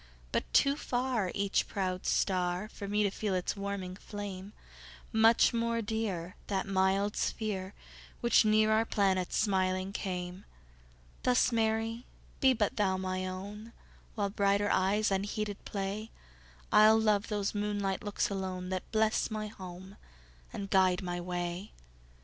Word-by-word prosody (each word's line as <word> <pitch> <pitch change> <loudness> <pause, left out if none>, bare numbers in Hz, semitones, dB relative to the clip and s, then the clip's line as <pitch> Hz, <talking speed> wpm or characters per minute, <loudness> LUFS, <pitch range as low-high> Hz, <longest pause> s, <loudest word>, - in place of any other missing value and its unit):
But - - -1
too 275 - +5
farEach 235 -8 0
proud 185 -2 -2
star, 180 +1 +1
For 200 - -7
me 210 +1 +1
to 200 - +1
feel 200 -1 -2
its 180 +2 -1
warming 200 -2 -4
flame; 200 -1 -7 0.6
Much 225 +2 +5
more 230 0 0
dear, 205 -5 -3
That 195 -2 -1
mild 195 +1 +1
sphere, 200 -3 -2 0.4
Which 235 -1 +5
near 215 0 +4
our 220 +1 +4
planet 190 -4 +1
smiling 190 -2 +1
came; 180 -1 -4 0.8
Thus, 250 0 +3
Mary, 225 +1 0 0.3
be 265 - +5
but 220 -3 0
thou 190 -3 +2
my 185 0 -2
own; 205 +5 -7 0.4
While 200 -3 -1
brighter 200 0 +2
eyes 200 +3 +2
unheeded 205 +1 -2
play, 200 +2 -3 0.6
I'll 215 +1 +7
love 210 -2 +2
those 205 -2 -1
moonlight 205 -2 -1
looks 205 -1 0
alone, 185 -2 -3
That 185 -1 -4
bless 220 -1 +2
my 215 -1 -4
home 190 0 -10 0.5
and 195 -1 -6
guide 185 -1 +4
my 175 -1 -3
way. 175 +2 -4
200 Hz, 135 wpm, -31 LUFS, 185-215 Hz, 0.8 s, I'll